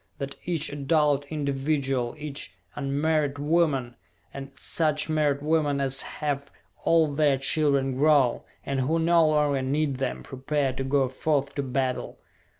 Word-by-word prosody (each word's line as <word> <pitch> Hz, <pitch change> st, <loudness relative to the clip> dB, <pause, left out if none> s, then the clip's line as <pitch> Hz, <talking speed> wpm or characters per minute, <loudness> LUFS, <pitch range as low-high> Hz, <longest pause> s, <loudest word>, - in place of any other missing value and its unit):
That 140 Hz, -1 st, -5 dB
each 165 Hz, -5 st, -1 dB
adult 145 Hz, 0 st, +1 dB
individual, 140 Hz, -3 st, -1 dB
each 145 Hz, -, -7 dB, 0.2 s
unmarried 145 Hz, +1 st, 0 dB
woman, 145 Hz, -5 st, +1 dB, 0.4 s
and 135 Hz, 0 st, -7 dB
such 155 Hz, 0 st, -1 dB
married 145 Hz, -2 st, +1 dB
woman 150 Hz, -2 st, +1 dB
as 135 Hz, -1 st, +2 dB
have 140 Hz, -2 st, -4 dB, 0.4 s
all 160 Hz, -3 st, +3 dB
their 145 Hz, -2 st, +3 dB
children 135 Hz, -1 st, +2 dB
grown, 140 Hz, -3 st, +3 dB, 0.2 s
and 140 Hz, -1 st, -1 dB
who 145 Hz, +6 st, +1 dB
no 165 Hz, 0 st, +4 dB
longer 150 Hz, -3 st, +2 dB
need 140 Hz, +1 st, -1 dB
them, 130 Hz, -1 st, -3 dB
prepare 135 Hz, +1 st, -2 dB
to 135 Hz, -, -4 dB
go 135 Hz, 0 st, +1 dB
forth 140 Hz, +1 st, -1 dB
to 140 Hz, -, -2 dB
battle! 130 Hz, -1 st, -2 dB
140 Hz, 140 wpm, -26 LUFS, 135-155 Hz, 0.4 s, no